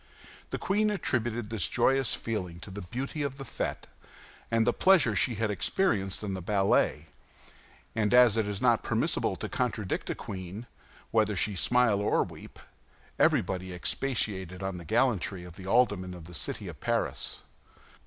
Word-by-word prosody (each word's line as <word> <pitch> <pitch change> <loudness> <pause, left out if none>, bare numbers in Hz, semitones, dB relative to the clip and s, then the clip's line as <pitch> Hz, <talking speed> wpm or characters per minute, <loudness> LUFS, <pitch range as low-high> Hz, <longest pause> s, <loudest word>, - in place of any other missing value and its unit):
The - - -3
queen 210 +2 +1
attributed 120 - -1
this 105 -8 +2
joyous 135 -3 +2
feeling 90 -7 -4
to 100 - -9
the 100 +2 -6
beauty 130 - -4
of 140 -2 -2
the 135 - -6
fête, 130 - -4 0.7
to 115 - +3
the 120 - +2
pleasure 170 - +4
she 115 +4 +2
had 110 0 0
experienced 100 - 0
in 100 -2 -2
the 95 - -4
ballet; 95 -5 +2 0.9
and 105 -2 +1
as 125 -3 +7
it 110 -2 +1
is 100 -1 -3
not - - +4
permissible - - 0
to - - -4
contradict - - -2
a - - -1
queen, 95 +4 -7 0.5
whether 110 -2 +2
she 100 +3 +1
smile 115 0 +3
or 105 - +2
weep, - - -11 0.6
everybody 95 0 +2
expatiated 95 -4 -2
on 95 -2 -3
the 85 - -10
gallantry 110 -4 +1
of 90 -1 -11
the 95 -1 -9
aldermen 100 -5 +2
of 85 -3 -11
the 90 - -11
city - - -2
of - - -8
Paris. - - -1
105 Hz, 165 wpm, -29 LUFS, 95-120 Hz, 0.9 s, as